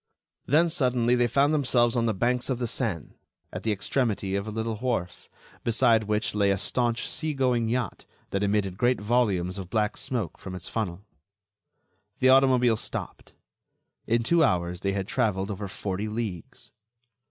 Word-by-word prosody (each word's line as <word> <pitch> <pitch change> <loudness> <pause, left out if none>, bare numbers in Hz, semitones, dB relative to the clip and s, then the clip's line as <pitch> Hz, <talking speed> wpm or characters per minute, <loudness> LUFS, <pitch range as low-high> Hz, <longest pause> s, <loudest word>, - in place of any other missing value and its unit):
Then, 160 +6 +4
suddenly, 125 -7 +1
they 120 -1 +3
found 140 +5 +2
themselves 120 -5 +2
on 115 -1 +1
the 110 - +1
banks 125 +6 0
of 130 - 0
the 125 - -2
Seine, 110 - -3 0.3
at - - -4
the 110 - 0
extremity 100 -1 -1
of 100 +2 -2
a - - -3
little 110 0 -3
wharf, 110 -8 -3 0.3
beside 115 -1 +3
which 105 +1 -1
lay 100 -1 +2
a 100 - +2
staunch 115 +4 -1
sea 155 -2 -2
going 125 -4 +1
yacht 120 -4 -3 0.2
that 100 - -1
emitted 100 -2 0
great 125 +1 +2
volumes 105 -5 0
of 90 -2 -7
black 105 -1 0
smoke 115 -10 -3
from 95 -1 -7
its 90 - -7
funnel. 100 -3 -4 1.1
The 130 - +3
automobile 130 -3 +5
stopped. - - -6 0.7
In 115 +1 +2
two 170 +7 +3
hours 90 - 0
they 100 +1 -1
had 95 -1 -2
traveled 100 -2 0
over 100 0 -5
forty 100 +2 -4
leagues. 105 -6 -5
110 Hz, 165 wpm, -26 LUFS, 100-125 Hz, 1.1 s, automobile